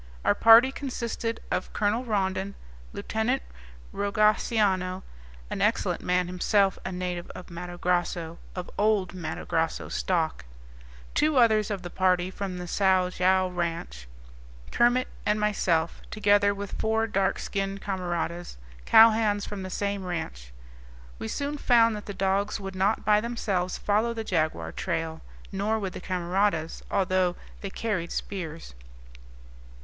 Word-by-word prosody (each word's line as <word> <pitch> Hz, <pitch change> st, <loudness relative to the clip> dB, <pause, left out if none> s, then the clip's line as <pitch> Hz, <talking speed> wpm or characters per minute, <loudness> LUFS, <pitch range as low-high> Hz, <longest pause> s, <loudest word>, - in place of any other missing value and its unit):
Our -, -, +5 dB
party 230 Hz, +4 st, +7 dB
consisted 235 Hz, -4 st, -4 dB
of -, -, -2 dB
Colonel 210 Hz, +4 st, +1 dB
Rondon, 195 Hz, -3 st, -1 dB, 0.4 s
Lieutenant 230 Hz, -, -1 dB, 0.5 s
Rogaciano 200 Hz, -2 st, +1 dB, 0.5 s
an -, -, -3 dB
excellent -, -, +1 dB
man, 180 Hz, 0 st, +1 dB
himself 190 Hz, +2 st, +1 dB
a 190 Hz, -, -4 dB
native 180 Hz, -1 st, -4 dB
of 180 Hz, -1 st, -10 dB
Matto 175 Hz, +1 st, -7 dB
Grosso, 175 Hz, -2 st, -1 dB, 0.2 s
of 180 Hz, -1 st, -4 dB
old 205 Hz, -3 st, +2 dB
Matto 180 Hz, -3 st, -5 dB
Grosso 165 Hz, 0 st, -1 dB
stock 165 Hz, -, -1 dB, 0.7 s
two 305 Hz, -1 st, +2 dB
others 220 Hz, -3 st, +4 dB
of 200 Hz, -3 st, -3 dB
the 175 Hz, -, -7 dB
party 185 Hz, -1 st, +2 dB
from 190 Hz, -2 st, -4 dB
the 180 Hz, 0 st, -6 dB
Sao 185 Hz, 0 st, +2 dB
Joao 185 Hz, +1 st, +2 dB
ranch, 165 Hz, -, -4 dB, 0.6 s
Kermit, 245 Hz, +2 st, +3 dB, 0.2 s
and 210 Hz, +1 st, +1 dB
myself, 175 Hz, -6 st, +1 dB
together 205 Hz, -1 st, +3 dB
with 200 Hz, 0 st, -5 dB
four 220 Hz, 0 st, +1 dB
dark 195 Hz, -3 st, 0 dB
skinned 195 Hz, -1 st, -3 dB
camaradas, 175 Hz, -, -3 dB, 0.3 s
cowhands 220 Hz, -2 st, +6 dB
from 205 Hz, -2 st, -6 dB
the 185 Hz, -, -5 dB
same 200 Hz, +1 st, -2 dB
ranch. 160 Hz, -, -5 dB, 0.7 s
We -, -, -4 dB
soon 285 Hz, -, -3 dB
found 230 Hz, -4 st, +4 dB
that 210 Hz, -, -8 dB
the 205 Hz, -, -4 dB
dogs 195 Hz, +2 st, 0 dB
would 195 Hz, -1 st, -6 dB
not 195 Hz, +4 st, +1 dB
by 210 Hz, 0 st, +4 dB
themselves 200 Hz, -6 st, -2 dB
follow 220 Hz, +3 st, +1 dB
the 225 Hz, -, -3 dB
jaguar 155 Hz, -, -1 dB
trail; 160 Hz, -, -3 dB, 0.3 s
nor 205 Hz, +3 st, 0 dB
would 195 Hz, -4 st, -4 dB
the -, -, -7 dB
camaradas, 180 Hz, -2 st, 0 dB
although 185 Hz, -2 st, +1 dB, 0.3 s
they 195 Hz, -, -4 dB
carried 190 Hz, -5 st, -2 dB
spears. 165 Hz, -, -5 dB
195 Hz, 135 wpm, -27 LUFS, 180-215 Hz, 0.7 s, party